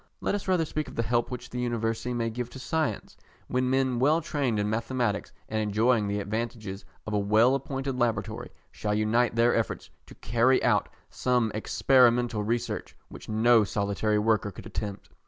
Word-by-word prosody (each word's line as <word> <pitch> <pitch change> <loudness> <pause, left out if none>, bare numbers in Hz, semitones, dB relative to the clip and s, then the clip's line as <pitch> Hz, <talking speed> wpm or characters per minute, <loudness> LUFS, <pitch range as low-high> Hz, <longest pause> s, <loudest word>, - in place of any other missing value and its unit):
Let - - -1
us 205 -1 -3
rather 180 -3 +2
speak 155 0 -3
of - - -10
the 115 - 0
help 120 0 0
which 125 -1 -7
the 125 - -4
University 120 0 -1
may 115 -1 -1
give 120 +1 -4
to 130 - -10
science, 160 +3 -2 0.3
when 125 0 0
men 130 -2 +1
well 150 +5 +4
trained 140 -8 -1
in 105 0 0
mathematics 115 0 -1 0.2
and 110 - -2
enjoying 110 +1 +2
the 100 +1 -1
advantages 105 -2 -4 0.2
of 110 - -4
a 105 - +2
well 110 +5 +4
appointed 135 -1 -3
Laboratory, 115 -5 -1 0.2
shall 105 0 -2
unite 110 +3 +2
their 115 +1 +4
efforts 115 - -2 0.2
to - - -13
carry 120 +3 +2
out - - +2 0.2
some 125 -3 +1
experimental 120 0 +3
research 115 +3 -3
which - - -11
no 110 +1 +5
solitary 100 +1 0
worker 105 -1 +2
could 95 - -11
attempt. 100 -2 -5
115 Hz, 175 wpm, -27 LUFS, 110-125 Hz, 0.3 s, no